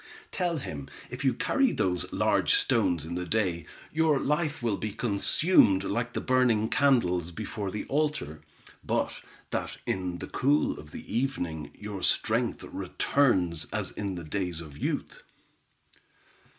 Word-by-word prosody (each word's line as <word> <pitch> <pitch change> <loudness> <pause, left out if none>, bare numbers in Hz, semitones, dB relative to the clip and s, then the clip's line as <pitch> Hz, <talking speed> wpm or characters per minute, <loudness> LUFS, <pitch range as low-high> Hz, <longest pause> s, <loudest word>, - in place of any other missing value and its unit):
"Tell 175 -3 0
him 70 - -6 0.2
if - - -5
you 130 -3 +3
carry 270 - +2
those 90 -2 -1
large - - +3
stones 85 -4 +2
in 85 - -5
the 90 +1 -2
day, 90 -6 0 0.3
your 160 -2 +3
life 150 -1 0
will 110 -4 +1
be 110 - -3
consumed 105 - +3
like 115 +3 -2
the - - -1
burning 125 -4 +3
candles 90 - +3
before 100 +2 -4
the 105 - -4
altar; 140 - -1 0.4
but - - -1 0.3
that - - -3
in 90 -2 -2
the - - -6
cool 145 +3 +1
of 75 - -11
the 105 - -7
evening, 90 - -1
your 105 -2 -6
strength - - +1
returns 90 - +1
as - - -2
in 100 -3 -3
the 85 - -6
days 90 0 -2
of 75 -4 -9
youth." 75 - -3
105 Hz, 145 wpm, -28 LUFS, 85-135 Hz, 0.4 s, you